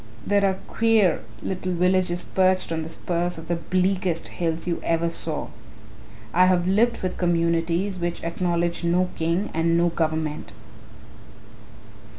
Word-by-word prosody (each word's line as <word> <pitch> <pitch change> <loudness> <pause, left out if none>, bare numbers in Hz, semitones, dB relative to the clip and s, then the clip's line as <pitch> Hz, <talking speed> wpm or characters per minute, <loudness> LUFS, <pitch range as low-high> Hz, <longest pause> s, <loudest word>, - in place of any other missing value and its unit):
There 200 0 +2
are 195 -1 +3
queer 225 -5 +3 0.2
little 185 -1 -3
villages 180 0 +1
perched 185 -2 +1
on 160 -1 -1
the 160 - -5
spurs 175 +1 -2
of 165 0 -9
the 175 - 0
bleakest 185 0 0
hills 165 -1 -2
you 170 -1 -2
ever 165 0 +1
saw. 160 -2 -2 0.8
I 180 +2 +5
have 180 -1 +2
lived 225 +5 +2
with 185 - -3
communities 170 +2 +1
which 175 0 -3
acknowledge 170 0 -1
no 180 +2 +2
king 170 +5 -1
and 165 +1 +2
no 175 0 +3
government. 155 -8 -2
175 Hz, 140 wpm, -24 LUFS, 165-185 Hz, 0.8 s, I